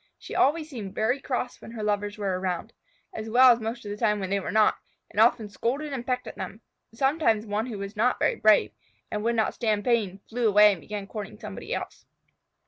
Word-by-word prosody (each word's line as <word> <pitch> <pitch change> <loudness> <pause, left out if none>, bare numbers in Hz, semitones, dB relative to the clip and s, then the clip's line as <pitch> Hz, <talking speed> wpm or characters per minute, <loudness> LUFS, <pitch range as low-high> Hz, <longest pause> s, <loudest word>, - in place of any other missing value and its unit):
She - - -10
always 305 +3 +2
seemed 220 -10 -7
very 245 +6 +1
cross 250 -2 -3
when - - -10
her 220 -2 -5
lovers 205 0 -1
were 195 -3 -1
around 185 +3 -3 0.4
(as 220 0 -5
well 250 +3 +7
as 235 - -4
most 225 +1 -5
of 205 - -5
the 205 - -5
time 210 0 +1
when 190 -1 -4
they 200 - +2
were 190 - -4
not), 215 0 +4 0.3
and - - -3
often 225 -1 +4
scolded 275 +8 -2
and 255 -3 -3
pecked 250 -1 -1
at - - -9
them. 215 - -6 0.3
Sometimes 230 -3 +1
one 215 +2 -2
who 225 -4 -5
was 200 +1 -6
not 240 +4 +2
brave, 215 - +4 0.4
and 210 0 -2
would 235 +1 +1
not 220 -1 +1
stand 215 -3 0
pain, 215 -6 +1
flew 235 0 0
away 210 0 +7
and 185 -5 -5
began 205 -1 -6
courting 210 -1 -7
somebody - - -8
else. - - -5
220 Hz, 220 wpm, -26 LUFS, 205-240 Hz, 0.4 s, well